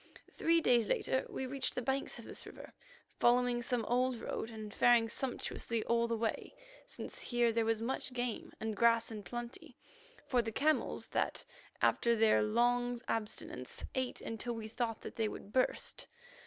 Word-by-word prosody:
Three 330 0 +3
days 240 -7 +4
later 260 - +1
we 265 - -3
reached 270 +1 -2
the - - -1
banks 265 +3 -1
of - - -10
this - - -7
river, - - -11 0.5
following 245 0 +4
some 235 -1 0
old 250 +2 +2
road, 225 - -3
and 215 -2 -7
faring 240 -2 +5
sumptuously 235 -2 -2
all 235 0 +2
the 230 0 0
way, 225 - -2 0.3
since - - -6
here 240 -1 +2
there 225 0 +1
was 225 0 +1
much 260 +2 -1
game 245 -2 -3
and 220 -1 -2
grass 230 +1 +4
in 215 -2 -5
plenty 240 +5 -7 0.5
for 250 -2 +3
the 225 -1 -4
camels 305 +7 +1
that, - - -1 0.4
after 235 0 +4
their 220 -1 +5
long 245 +2 +2
abstinence, 210 - -3
ate 260 -1 -2
until 230 +1 -3
we 220 -1 -5
thought 225 0 -2
that - - -8
they 225 -1 +2
would 205 -1 -8
burst. 255 -1 0
235 Hz, 170 wpm, -34 LUFS, 225-245 Hz, 0.5 s, faring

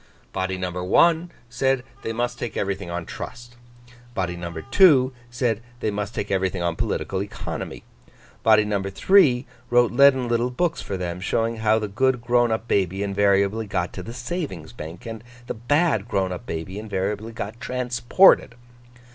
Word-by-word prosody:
Body 95 0 -2
number 90 -1 -3
one, 170 - +4 0.2
said 130 +1 0 0.2
they 115 - -3
must 120 +1 -2
take 120 - -4
everything 100 -2 -2
on 85 0 -4
trust. 120 +6 -8 0.6
Body 90 -2 -1
number 85 0 -6
two, 135 -4 +5 0.2
said 120 -3 -1 0.2
they 110 - -1
must 105 +1 -4
take 105 - -3
everything 95 -2 0
on 85 -1 0
political 100 -3 -2
economy. 100 - -6 0.6
Body 110 -1 +5
number 100 -2 -1
three, 130 - +4 0.2
wrote 120 0 +4
leaden 130 -1 +5
little 120 +1 +1
books 165 +6 -1
for 95 - -4
them, 90 -1 -4
showing 115 +4 0
how 110 0 +3
the 110 -1 -2
good 125 +5 +1
grown 120 0 +2
up 110 +1 -2
baby 95 -1 +1
invariably 100 +2 +2
got 90 -3 -2
to 95 - -6
the 110 - -8
Savings 120 - -5
bank, 80 +3 -9
and 115 -1 -7 0.2
the - - -3
bad 120 - +1
grown 95 -4 0
up 115 +7 -7
baby 85 +5 -5
invariably 105 +1 -3
got 110 +1 -6
transported. 125 +4 +3
110 Hz, 165 wpm, -23 LUFS, 95-120 Hz, 0.6 s, two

